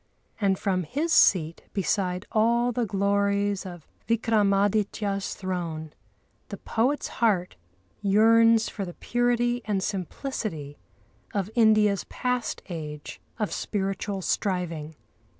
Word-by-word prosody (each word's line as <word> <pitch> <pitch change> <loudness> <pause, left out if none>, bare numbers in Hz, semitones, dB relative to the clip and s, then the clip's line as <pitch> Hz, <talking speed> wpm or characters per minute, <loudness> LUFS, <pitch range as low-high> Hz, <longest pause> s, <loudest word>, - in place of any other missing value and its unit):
And 195 -3 +2
from 185 -1 0
his 295 - -1
seat 165 -3 +4
beside 185 -1 -1
all 235 +2 +3
the 240 -1 -1
glories 200 0 +1
of 175 -3 -10 0.2
Vikramâditya's 205 -2 +1
throne 170 -5 -4 0.6
the - - -6
poet's 255 +6 0
heart 195 -6 +2 0.5
yearns 225 +2 +5
for 200 - -5
the 175 -2 -7
purity 240 0 0
and 200 -3 -1
simplicity 190 - -4 0.6
of 200 +1 -1
India's 215 -3 +4
past 250 -1 -2
age 150 -5 -7 0.2
of 215 -3 -2
spiritual 195 -1 -2
striving. 170 -7 -2
200 Hz, 105 wpm, -26 LUFS, 185-225 Hz, 0.6 s, yearns